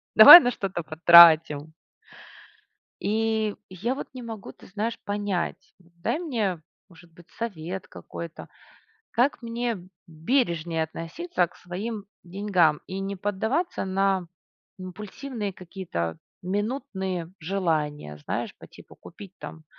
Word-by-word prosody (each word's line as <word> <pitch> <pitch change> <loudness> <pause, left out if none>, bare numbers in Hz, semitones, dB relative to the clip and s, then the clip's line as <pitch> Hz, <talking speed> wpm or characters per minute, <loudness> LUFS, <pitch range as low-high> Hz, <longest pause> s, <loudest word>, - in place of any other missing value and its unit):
Давай 350 - +13
на 245 -5 0
что-то 190 -6 -4
потратим?" 160 -2 +6 1.3
И 220 0 0
я 210 +8 -3
вот - - -6
не 255 - -8
могу, 225 -3 -8
ты - - -17
знаешь, 215 +4 -4
понять. 205 -3 -3
Дай 170 - -4
мне, 220 - -2 0.3
может 175 -1 -18
быть, 170 +1 -19
совет 190 -5 -6
какой-то, 170 -1 -9 0.6
как 250 +3 +1
мне 230 -5 -4 0.2
бережнее 170 - -1
относиться 175 - -3
к 170 - -21
своим 200 +4 -6 0.2
деньгам 180 -4 +1
и 190 +1 -5
не 195 +1 -4
поддаваться 220 - -2
на 190 -1 0 0.5
импульсивные 210 +4 -6
какие-то 175 - -5 0.2
минутные 190 -4 -3
желания, 155 - -2
знаешь, - - -4
по - - -14
типу - - -16
купить 195 +1 -13
там 160 -1 -10
190 Hz, 115 wpm, -25 LUFS, 170-220 Hz, 1.3 s, Давай